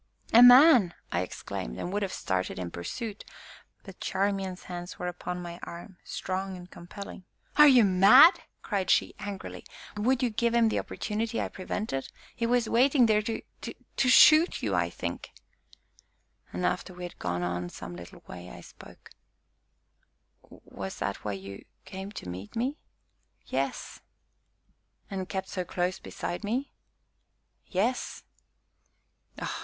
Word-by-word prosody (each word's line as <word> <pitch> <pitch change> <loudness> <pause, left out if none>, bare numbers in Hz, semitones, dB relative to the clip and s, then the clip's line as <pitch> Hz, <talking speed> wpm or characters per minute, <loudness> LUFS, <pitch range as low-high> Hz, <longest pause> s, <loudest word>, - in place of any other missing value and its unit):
"A 235 - +9
man!" 245 - +8 0.2
I 85 - 0
exclaimed, 60 -8 -6
and 180 - -4
would 205 - 0
have 195 -2 -2
started 95 -1 -2
in 90 -2 -5
pursuit, 210 - -6 0.6
but 195 -2 -12
Charmian's 195 -1 -2
hands 175 0 -7
were 180 - -5
upon 180 0 -5
my 170 0 -8
arm, 175 +2 -9
strong 190 0 -4
and 180 0 -11
compelling. 185 +2 -10 0.3
"Are 300 0 +8
you 255 -4 +7
mad?" 200 - +7 0.2
cried 195 -3 -2
she - - +3
angrily; 200 -2 -7 0.3
"would 250 +5 +1
you 245 - +1
give 235 +2 0
him 230 -1 +4
the - - 0
opportunity 225 +2 -3
I - - -2
prevented? 185 -7 -4 0.3
He 230 - -1
was 240 -1 +2
waiting 255 +2 +4
there 215 -1 +3
to 225 +1 -4 0.2
to 255 - -3
shoot 310 +6 +7
you, - - 0
I - - +1
think!" - - -5 1.2
And, - - -3
after 185 - -2
we 180 - -8
had 175 - -8
gone 90 0 -2
on 90 0 -3
some 90 - -8
little 85 0 -12
way, 90 0 -10
I - - -11
spoke. - - -15 1.4
"Was 95 -1 -8
that 100 - -2
why 105 - -4
you 100 0 -8 0.2
came 190 +1 -7
to 90 - -8
meet 90 +3 -8
me?" 260 +6 -2 0.7
"Yes." - - -3 1.1
"And 190 -1 -4
kept 190 0 -4
so 185 - -3
close 180 +1 -2
beside 175 - -5
me." 245 +7 -2 0.9
"Yes." 225 +7 -1
190 Hz, 145 wpm, -28 LUFS, 175-230 Hz, 1.4 s, A